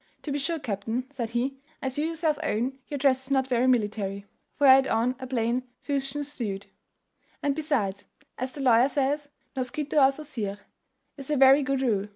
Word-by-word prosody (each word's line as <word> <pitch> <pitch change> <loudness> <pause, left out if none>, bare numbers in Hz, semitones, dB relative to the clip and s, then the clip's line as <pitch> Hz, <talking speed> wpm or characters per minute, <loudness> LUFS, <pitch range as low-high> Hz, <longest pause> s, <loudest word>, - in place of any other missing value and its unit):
"To 300 - -4
be 285 - -1
sure, 330 +4 -1
captain," 230 -1 -3
said 245 -5 -4
he, 255 +3 -2 0.2
"as 265 +1 -3
you 310 - +1
yourself 320 -2 0
own, 265 -2 -1
your 290 - -4
dress 265 -1 +2
is - - -10
not 265 -1 +2
very 255 -1 +1
military" 205 -5 0 0.3
(for 290 - +2
he 265 - +10
had 265 0 +5
on 240 +3 +1
a 260 - -6
plain 240 0 0 0.2
fustian 280 0 -2
suit); 220 -9 -5 0.8
"and 285 - +2
besides, 245 -11 -1 0.3
as 255 +1 -4
the 280 - -7
lawyer 250 0 +5
says, 285 +1 0 0.3
noscitur 270 +4 -3
a 270 -1 +6
sosir, 260 -9 -5 0.6
is 275 0 -9
a 300 - +1
very 270 +2 +7
good 270 -1 0
rule. 210 -5 +1
265 Hz, 190 wpm, -27 LUFS, 235-285 Hz, 0.8 s, he